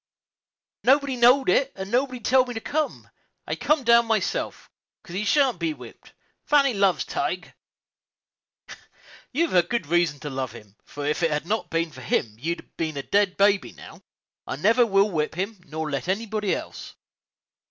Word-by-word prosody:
"Nobody 275 0 +3
knowed 250 +3 +5
it, 275 0 +3
and 195 +1 -7
nobody 255 +1 0
telled 255 +2 +3
me 245 - -6
to - - -2
come; 305 +6 -3 0.4
I - - -3
comed 300 -4 +1
my 235 -1 +5
own 215 - 0
self, - - -4 0.4
'cause 170 - -11
he 195 +3 -2
shan't 255 - +2
be 165 -3 -1
whipped. - - -14 0.3
Fannie 280 -3 +3
loves 195 -3 +2
Tige." - - -3 1.8
"You've 250 - +2
good 235 -6 -1
reason 165 -2 +1
to 145 - -5
love 130 -2 -4
him, 105 -1 -14
for 145 0 -7
if 150 +3 -1
it 165 - +3
had 150 0 -2
not 220 +5 -2
been 165 0 -1
for 130 - -12
him 115 -3 -1
you'd 170 +6 -5
been 160 -3 -3
a 140 - -3
dead 200 +1 +1
baby 200 -1 +2
now. - - -13 0.5
I - - -3
never 225 - +3
will 200 0 +3
whip 155 -2 -1
him, 195 +2 -4
nor 155 +1 -4
let 140 +3 -3
anybody 210 +1 -1
else." - - -8
195 Hz, 175 wpm, -24 LUFS, 160-240 Hz, 1.8 s, knowed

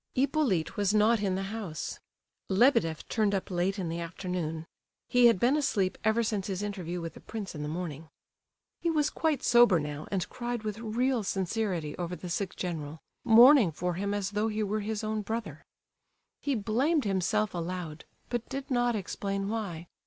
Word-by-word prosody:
Hippolyte 255 - +1
was 205 0 +2
not 215 +1 +4
in 195 -2 0
the 195 - -2
house. 190 -9 -5 0.5
Lebedeff 190 - +3
turned 210 -3 +1
up 190 - -3
late 185 +3 0
in 185 -3 -2
the 165 +1 -3
afternoon; 170 -2 -4 0.4
he 245 -1 +6
had 230 -6 +4
been 250 +7 +3
asleep 210 -11 +1
ever 220 +2 +3
since 210 -3 -1
his 195 0 -3
interview 180 -4 -4
with 165 -1 -5
the - - -12
prince 215 -4 -6
in 150 - -6
the 150 - -3
morning. 160 -2 -5 0.7
He 340 - 0
was 305 -2 +1
quite 310 -5 0
sober 240 -7 +6
now, 150 0 -5
and 190 -3 -1
cried 240 -2 -4
with 215 0 -4
real 235 +2 0
sincerity 190 -5 -2
over 175 0 -3
the 175 +1 -7
sick 190 +1 -2
general—mourning 180 - +4
for 180 +3 -2
him 200 +3 -2
as 200 -1 -2
though 210 +1 0
he 215 0 -1
were 210 +1 -1
his 215 +1 -3
own 215 0 -1
brother. 225 +3 -5 0.8
He 285 -2 -1
blamed 255 +9 +1
himself 205 +2 0
aloud, 170 -2 -5 0.2
but 240 -1 -3
did 275 +1 -5
not 245 -1 +2
explain 195 0 -3
why. 200 -7 -4
205 Hz, 175 wpm, -29 LUFS, 180-230 Hz, 0.8 s, he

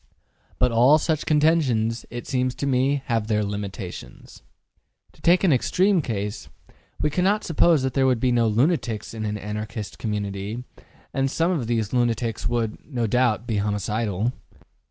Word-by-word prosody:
But 125 -1 +2
all 125 +6 +6
such 155 -1 -1
contentions, 145 -8 +2
it 120 +1 -6
seems 130 -1 -1
to 140 - -3
me, 135 +1 +1
have 115 -3 -1
their 105 -1 +1
limitations. 100 -2 -7 0.7
To - - -23
take 175 +3 +4
an 180 -6 +5
extreme 185 - +2
case, 105 -5 -4 0.5
we 150 - +1
cannot 195 +6 +1
suppose 165 -2 +3
that 130 -1 -1
there 135 -1 +3
would 125 -3 +2
be 125 +1 +2
no 120 -1 +3
lunatics 120 -2 0
in 110 -1 -4
an 105 0 -2
Anarchist 105 +1 -6
community, 105 +1 -3 0.5
and 135 0 +1
some 165 +6 +1
of 145 -11 -1
these 115 -2 -1
lunatics 120 -2 0
would, 115 -3 -1
no 125 -5 -2
doubt, 120 -1 +1
be 110 -3 -1
homicidal. 105 +1 -1
120 Hz, 155 wpm, -24 LUFS, 105-140 Hz, 0.7 s, all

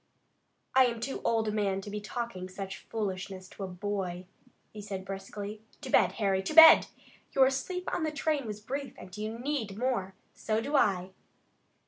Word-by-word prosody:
"I 260 -1 +6
am 235 -1 -3
too 260 +4 -4
old 225 -1 +1
a - - +1
man 200 -2 0
to 205 - -8
be 210 0 -4
talking 215 -4 -5
such 190 0 -6
foolishness 190 -3 -5
to 200 - -8
a - - -3
boy," 185 -1 -4 0.5
he 210 - -7
said, 195 -2 -6
briskly. 200 +2 -6 0.2
"To 265 -3 -6
bed, - - +4
Harry! 195 -3 +1
To 190 +10 -4
bed! 320 0 +10 0.5
Your 265 0 +5
sleep 360 +8 -3
on - - -1
the 315 -1 0
train 295 -3 -1
was 210 0 -6
brief 270 +4 -5
and 185 0 -11
you 215 +2 -4
need 240 -6 -3
more! 220 -6 -1 0.2
So 220 0 -1
do 285 +6 -2
I!" 190 -8 +2
210 Hz, 180 wpm, -30 LUFS, 195-255 Hz, 0.5 s, bed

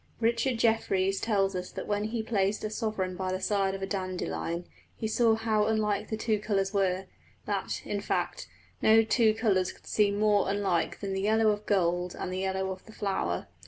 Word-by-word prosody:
Richard 235 +2 +1
Jefferies 195 -4 +1
tells 195 -3 +1
us 180 0 -4
that - - -6
when 205 0 -1
he 220 +1 -2
placed 205 -2 0
a 215 - -2
sovereign 215 -5 -2
by 185 0 -2
the 185 - -1
side 195 -1 +1
of 195 - -6
a - - +1
dandelion 90 - -3 0.3
he - - -3
saw 225 0 +3
how 220 -1 +1
unlike 215 -2 0
the 220 - -2
two 215 -1 0
colours 200 -2 0
were 190 -1 +1 0.4
that, - - -2
in - - -2
fact, - - -2 0.3
no 220 +1 +6
two 220 -1 +3
colours 195 -5 +1
could - - -19
seem 205 -1 +2
more 205 -2 +3
unlike 195 -4 0
than 195 -1 -3
the 190 - -1
yellow 220 +1 +3
of 210 0 -4
gold 180 -2 +1
and 185 - -4
the 185 - -2
yellow 190 0 -1
of 185 0 -7
the - - -11
flower. 140 - -2
200 Hz, 195 wpm, -29 LUFS, 190-220 Hz, 0.4 s, no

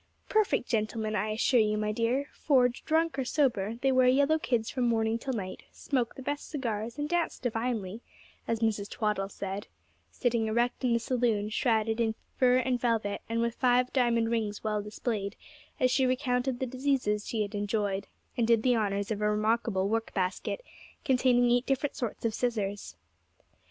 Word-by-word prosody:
'Perfect 430 - +2
gentlemen, 215 -1 -1
I 210 +2 0
assure 230 +3 +2
you, 215 -1 +2
my 210 0 0
dear; 235 +6 0
for, 260 -4 +3
drunk 315 +4 0
or - - +1
sober, 235 -7 +1
they 270 - +4
wear 255 -1 +4
yellow 285 +5 +4
kids 235 -6 0
from 250 -2 0
morning 225 0 +1
till 265 +2 -3
night, 185 -4 -5
smoke 250 -5 -2
the 265 - -9
best 290 +2 -4
cigars, 230 -5 -3
and 295 0 -2
dance 345 +1 0
divinely,' 225 -3 -2 0.5
as 230 -1 -1
Mrs. 210 -3 0
Twaddle 210 -3 -1
said, 200 +1 -5 0.4
sitting 235 -3 0
erect 240 +4 0
in 245 -2 +3
the 235 - +3
saloon, 230 -4 0
shrouded 220 0 +1
in 220 -1 +1 0.2
fur 250 -1 +4
and 255 -1 0
velvet, 225 -4 0
with 230 0 0
five 250 0 +2
diamond 235 -3 +2
rings 215 -3 -2
well 210 -1 0
displayed, 210 -1 -3 0.4
as 255 -1 +3
she 265 -1 +3
recounted 255 -1 0
the 260 - 0
diseases 255 -5 0
she 220 -2 0
had 205 +1 -6
enjoyed, 205 -1 -1 0.3
and 235 -2 +1
did 230 -2 +4
the 250 -1 +4
honours 200 -1 -1
of 210 -1 -2
a 210 - +2
remarkable 215 -2 +1
work 225 +2 -2
basket, 190 - -2 0.4
containing 250 -3 +3
eight 245 +2 +2
different 270 +1 0
sorts 235 -2 -4
of 225 - +1
scissors. 205 - -2
230 Hz, 175 wpm, -29 LUFS, 215-255 Hz, 0.5 s, they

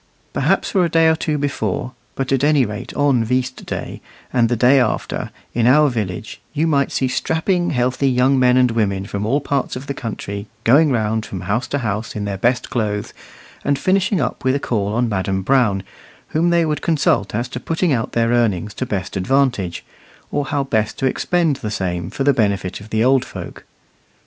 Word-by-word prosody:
Perhaps - - +1
for 190 -3 +3
a 170 - +1
day 165 0 +4
or 160 - +4
two 155 -1 -1
before, 130 -5 -2 0.2
but 135 -1 -2
at 135 0 +2
any 145 -3 +4
rate 105 +3 -6
on 140 -5 +3
"veast 130 +2 -2
day" - - -5 0.3
and 120 -3 +3
the 120 - +1
day 125 +4 +5
after, 120 -4 -1 0.2
in 120 0 +2
our 150 +3 +5
village, 105 -5 -4
you 155 +2 +1
might 140 -4 +1
see 130 - 0
strapping, 175 +6 0
healthy 130 +1 +1
young 130 +1 +3
men 125 0 +4
and 125 -2 +4
women 100 -4 0
from 100 +1 -3
all 140 +5 +2
parts 140 -1 -2
of 130 +2 -6
the 140 - -3
country 100 -4 -5 0.2
going 145 +7 +5
round 110 -2 0
from 95 -4 -6
house 100 +7 -1
to 145 - -1
house 110 -3 -3
in 105 -1 -3
their 100 -2 -3
best 125 +3 0
clothes, 105 -3 -2 0.5
and 140 0 +1
finishing 190 +4 +1
up 125 -4 -2
with 130 +1 +2
a - - 0
call 105 -6 -1
on 120 +3 +1
Madam 95 -2 -1
Brown, 110 -5 +2 0.5
whom 165 +3 +1
they 170 -1 +3
would 150 -2 -1
consult 125 - +1
as 120 +3 -1
to 125 - -5
putting 165 +2 0
out 115 -2 -2
their 115 0 +2
earnings 105 -4 +1
to 130 - -3
the - - -16
best 95 -2 -3
advantage, 120 -4 0 0.5
or 145 -1 -1
how 140 +1 -1
best 110 -5 -1
to - - -1
expend 160 +2 +1
the 110 - -5
same 90 -4 -2
for 135 - -3
the 140 0 +4
benefit 100 -5 -1
of 105 - -12
the 110 +1 +1
old 130 0 +4
folk. - - -9
125 Hz, 205 wpm, -19 LUFS, 105-140 Hz, 0.5 s, day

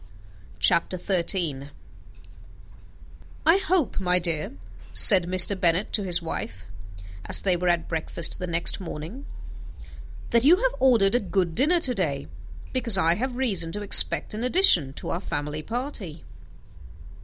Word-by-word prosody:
CHAPTER 170 +2 +1
XIII 170 -6 -4 1.8
"I 330 +3 +4
hope, 375 - -2
my 180 -1 -1
dear," 170 -3 -4 0.4
said 185 -4 +7
Mr. 185 +2 +7
Bennet 180 +2 -2
to 210 - 0
his 180 -3 -2
wife, 190 +7 -8 0.6
as - - +3
they 185 -2 -1
were 180 +1 -4
at 170 -1 -2
breakfast 160 0 -2
the 180 - -6
next 170 0 -1
morning, 180 - -9 1.0
"that 235 0 +1
you 310 +6 +5
have - - -2
ordered 230 -7 +2
a 245 - +1
good 180 -4 -3
dinner 305 - 0
to 255 -5 0
day, 155 - -4 0.5
because 235 -6 +3
I 165 -2 +1
have 245 +6 -5
reason 200 -11 -2
to 205 0 -6
expect 205 - +5
an 215 +2 -6
addition 250 - +3
to - - -9
our 170 - -5
family 150 -3 -6
party." 225 - -7
185 Hz, 145 wpm, -23 LUFS, 170-245 Hz, 1.8 s, said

